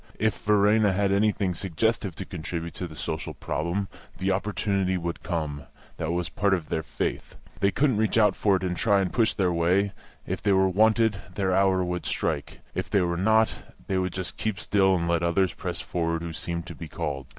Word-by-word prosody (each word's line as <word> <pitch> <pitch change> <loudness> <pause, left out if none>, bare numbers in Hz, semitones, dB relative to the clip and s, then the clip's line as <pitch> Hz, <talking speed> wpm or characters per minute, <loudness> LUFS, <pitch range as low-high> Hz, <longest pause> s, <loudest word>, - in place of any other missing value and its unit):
If 110 0 0
Verena 105 0 +4
had 100 +1 +1
anything 100 -2 +2
suggestive 95 +1 -1
to 95 - -6
contribute 85 -1 -5
to 90 - -5
the 80 - -11
social 80 0 -4
problem, 85 +5 -2 0.3
the 95 +1 0
opportunity 95 -1 0
would 85 -1 -4
come 75 -5 -3 0.3
that 80 - -2
was 85 0 -1
part 100 -1 +1
of 85 -4 -6
their 80 - 0
faith. - - -4 0.2
They 100 - +3
couldn't 130 +1 +2
reach 110 +1 +1
out 105 -2 +5
for 100 -2 +3
it 95 - -2
and 90 -1 -1
try 100 +1 +3
and 95 -2 -1
push 115 -2 +2
their 90 -3 +1
way; 90 +4 +2 0.3
if 95 - -3
they 100 - +3
were 95 0 +4
wanted, 110 +1 +3
their 95 -2 +1
hour 95 -1 +3
would 90 0 -3
strike; 75 -4 -2
if - - -3
they 100 - +3
were 85 -1 0
not, 110 +5 +3 0.3
they 95 -1 0
would 90 -1 -1
just 95 -1 -4
keep 110 -3 -2
still 95 -2 +3
and 85 -1 -1
let 85 -1 +2
others 85 +2 +2
press - - -5
forward 85 -1 -2
who 85 -1 -5
seemed 85 +1 -4
to - - -7
be 85 - -8
called. 70 -6 -4
95 Hz, 205 wpm, -26 LUFS, 85-100 Hz, 0.3 s, out